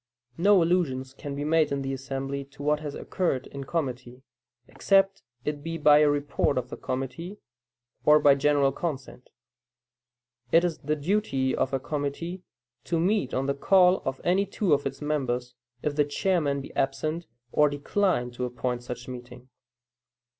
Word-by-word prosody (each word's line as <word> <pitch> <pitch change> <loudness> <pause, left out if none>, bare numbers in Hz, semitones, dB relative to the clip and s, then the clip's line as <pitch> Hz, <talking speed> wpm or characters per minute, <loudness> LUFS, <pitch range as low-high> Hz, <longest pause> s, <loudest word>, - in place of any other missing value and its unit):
No 195 0 +5
allusion 165 -7 +1 0.2
can 140 -1 -5
be 145 - -3
made 155 0 +2
in 140 -1 -1
the 135 0 -2
assembly 135 +1 -4
to 140 +1 -12
what 150 +1 +2
has 150 -2 -6
occurred 150 -9 -1
in 140 -1 -8
committee, 130 -5 -4 0.4
except 195 0 +2 0.2
it 150 -1 -2
be 165 +2 -4
by 150 -1 +6
a 150 -1 +5
report 145 -1 0
of 125 -1 -2
the - - -4
committee, 135 +9 -5 0.7
or 150 0 +6
by 145 -2 +6
general 140 0 +3
consent. 135 -6 -5 1.2
It 165 +1 +6
is 175 -3 -1
the 150 +2 -1
duty 145 -5 0
of 130 - 0
a 135 - 0
committee 150 +6 -4 0.4
to 170 -1 0
meet 180 -5 +1
on 130 - 0
the 140 - +1
call 180 +5 +4
of 135 0 -3
any 195 +3 +2
two 195 -2 +1
its 145 0 +1 0.2
of - - -4
members, 125 -4 -1 0.3
if 150 -1 -1
the 150 -1 +3
chairman 145 -2 0
be - - -11
absent 155 +5 -1 0.2
or 150 0 +4
decline 145 -2 0
to 125 +1 -3
appoint 125 0 -3
such 125 0 -7
meeting. 125 0 -10
145 Hz, 165 wpm, -27 LUFS, 135-165 Hz, 1.2 s, by